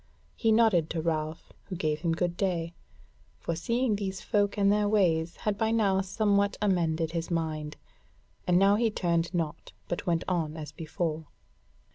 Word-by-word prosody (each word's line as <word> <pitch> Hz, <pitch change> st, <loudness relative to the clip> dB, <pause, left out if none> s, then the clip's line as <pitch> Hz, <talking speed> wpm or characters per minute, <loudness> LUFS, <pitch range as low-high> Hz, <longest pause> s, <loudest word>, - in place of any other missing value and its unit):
He 225 Hz, -, +2 dB
nodded 215 Hz, -8 st, +4 dB
to 165 Hz, -, -2 dB
Ralph, 155 Hz, -1 st, -3 dB
who 190 Hz, -, -6 dB
gave 155 Hz, -3 st, -1 dB
him 165 Hz, -1 st, +1 dB
good 175 Hz, +1 st, -1 dB
day; 175 Hz, -3 st, -1 dB, 0.6 s
for 170 Hz, -, -3 dB
seeing 235 Hz, +6 st, 0 dB
these 195 Hz, -1 st, -3 dB
folk 205 Hz, -1 st, 0 dB
and 200 Hz, -1 st, +4 dB
their 205 Hz, 0 st, +2 dB
ways 170 Hz, -6 st, +2 dB
had 210 Hz, -1 st, -2 dB
by 220 Hz, -, +2 dB
now 200 Hz, -4 st, +2 dB
somewhat 200 Hz, +1 st, +1 dB
amended 165 Hz, -5 st, +1 dB
his 165 Hz, 0 st, -3 dB
mind; 155 Hz, -3 st, -2 dB, 0.7 s
and 180 Hz, 0 st, +4 dB
now 200 Hz, +2 st, +5 dB
he 230 Hz, 0 st, +2 dB
turned 170 Hz, -4 st, 0 dB
not, 165 Hz, -4 st, -3 dB
but 175 Hz, -, -4 dB
went 170 Hz, -1 st, +1 dB
on 165 Hz, -4 st, -1 dB
as 150 Hz, -1 st, -6 dB
before. 160 Hz, -1 st, -3 dB
175 Hz, 165 wpm, -29 LUFS, 165-205 Hz, 0.7 s, now